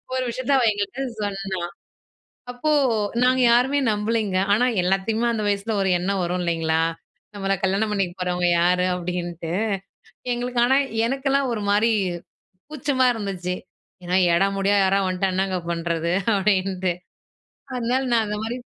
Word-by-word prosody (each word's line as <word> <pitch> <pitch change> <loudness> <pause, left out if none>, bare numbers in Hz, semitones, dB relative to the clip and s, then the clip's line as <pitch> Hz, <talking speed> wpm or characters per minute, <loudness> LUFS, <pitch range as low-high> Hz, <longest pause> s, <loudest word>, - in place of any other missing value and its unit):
ஒரு 260 - 0
விஷயத்தை 255 +3 -1
அவ 255 - +2
எங்கிட்ட 205 +6 -3 0.2
சொன்னா. 195 -2 -3 0.9
அப்போ 275 +5 -1 0.5
நாங்க 255 0 +3
யாருமே 265 +4 +3
நம்பலைங்க. 210 -2 0 0.2
ஆனா, 245 +4 +3 0.2
எல்லாத்தையுமே 195 +6 0
அந்த 215 -2 -2
வயசுல 205 +2 -1
ஒரு 190 - +1
எண்ணம் 190 +1 -1
வரும் 180 +1 -1
இல்லைங்களா, 165 -1 0 0.5
"நம்மள 195 -1 -1
கல்யாணம் 200 +3 +1
பண்ணிக்க 195 -4 -1
போறவங்க 180 -1 0
யாரு?" 180 +1 +3
அப்படின்னுட்டு. 175 -2 -4 0.8
எங்களுக்கு 245 0 -2
ஆனா 265 +2 +4 0.3
எனக்கெல்லாம் 270 0 0
ஒரு 210 - -3
மாதிரி 215 +3 +3 0.8
கூச்சமா 270 -3 +1
இருந்துச்சு. 185 -4 -3 0.5
ஏன்னா, 180 +1 +1 0.2
எடமுடியா 195 +2 +2
யாராவது 195 0 +2
வந்துட்டா 185 +1 0
என்னங்க 190 -1 0
பண்றது 170 0 -1 0.2
அப்படின்ட்டு. 190 -2 +1 0.8
அதனால 250 +2 0
நான் 225 -2 +3
அந்த 210 0 -3
மாரி 235 +3 -3
195 Hz, 130 wpm, -23 LUFS, 180-235 Hz, 0.9 s, ஆனா